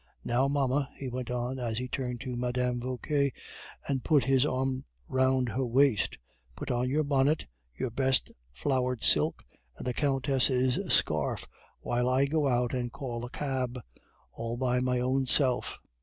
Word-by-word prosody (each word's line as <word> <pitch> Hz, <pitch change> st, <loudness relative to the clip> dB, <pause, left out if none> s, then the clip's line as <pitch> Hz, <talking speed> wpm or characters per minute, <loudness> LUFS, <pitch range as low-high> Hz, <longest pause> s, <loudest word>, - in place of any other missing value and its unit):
Now, 125 Hz, +3 st, +2 dB
mamma," 140 Hz, -1 st, +1 dB
he 135 Hz, -, -5 dB
went 125 Hz, 0 st, -4 dB
on, 125 Hz, +1 st, -2 dB
as 115 Hz, -3 st, -2 dB
he 125 Hz, +1 st, -2 dB
turned 125 Hz, -2 st, -3 dB
to 130 Hz, -2 st, -4 dB
Madame 125 Hz, 0 st, -1 dB
Vauquer 140 Hz, +3 st, 0 dB, 0.6 s
and 135 Hz, -3 st, -1 dB
put 150 Hz, -5 st, +4 dB
his 135 Hz, +2 st, +3 dB
arm 130 Hz, -1 st, -1 dB, 0.2 s
round 130 Hz, -1 st, +2 dB
her 130 Hz, +4 st, -1 dB
waist, 125 Hz, -2 st, +2 dB, 0.4 s
"put -, -, -4 dB
on 125 Hz, +1 st, 0 dB
your 150 Hz, +3 st, +2 dB
bonnet, 140 Hz, +2 st, +2 dB, 0.3 s
your 130 Hz, -, -2 dB
best 130 Hz, +2 st, +1 dB, 0.2 s
flowered 125 Hz, -, -1 dB
silk, -, -, +3 dB, 0.3 s
and -, -, -7 dB
the 125 Hz, -, -1 dB
countess' 135 Hz, -2 st, +2 dB
scarf, -, -, +1 dB, 0.3 s
while 120 Hz, +1 st, 0 dB
I 130 Hz, +2 st, +3 dB
go 150 Hz, 0 st, +1 dB
out 125 Hz, -1 st, +1 dB
and 120 Hz, -2 st, -2 dB
call 125 Hz, -4 st, -5 dB
a 120 Hz, -, -5 dB
cab 130 Hz, -3 st, -2 dB, 0.5 s
all 115 Hz, +1 st, -4 dB
my 125 Hz, 0 st, +1 dB
own 130 Hz, +1 st, +1 dB
self." 130 Hz, -2 st, +2 dB
130 Hz, 155 wpm, -29 LUFS, 125-135 Hz, 0.6 s, put